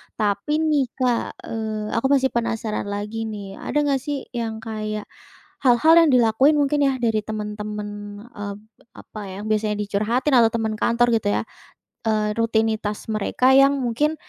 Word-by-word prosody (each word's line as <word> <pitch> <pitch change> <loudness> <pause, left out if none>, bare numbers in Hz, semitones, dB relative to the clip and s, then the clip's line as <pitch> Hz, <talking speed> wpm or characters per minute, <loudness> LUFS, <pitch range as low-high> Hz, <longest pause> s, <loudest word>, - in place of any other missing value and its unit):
Tapi 205 +6 -1 0.2
nih 285 -3 +3
Kak, 250 -3 +1 0.3
eee, 215 -1 -3
aku 230 +4 +1
masih 265 -1 +2
penasaran 225 -3 -2
lagi 210 +2 -4
nih. 200 -3 -7
Ada - - -6
nggak 280 -2 +1
sih, 285 -2 -2
yang 225 -2 -4
kayak, 215 -1 -4 0.6
hal-hal 265 +5 +5
yang 330 -3 +5
dilakuin 250 +5 +4
mungkin 290 0 +2
ya, 260 - -3
dari 225 -3 0
teman-teman, 210 0 -5 0.5
eb 200 -1 -6 0.4
apa 215 - -10
ya, 190 - -8
biasanya 215 -1 0
dicurhatin 215 +7 0
atau 230 -3 +6
teman 220 -1 -2
kantor 235 +2 +2
gitu 220 -2 0
ya, - - -1 0.7
eee, 215 -1 +1
rutinitas 220 -2 0
mereka 215 +5 +2
yang 275 +1 +6
mungkin 290 +6 0
225 Hz, 150 wpm, -22 LUFS, 210-255 Hz, 0.7 s, atau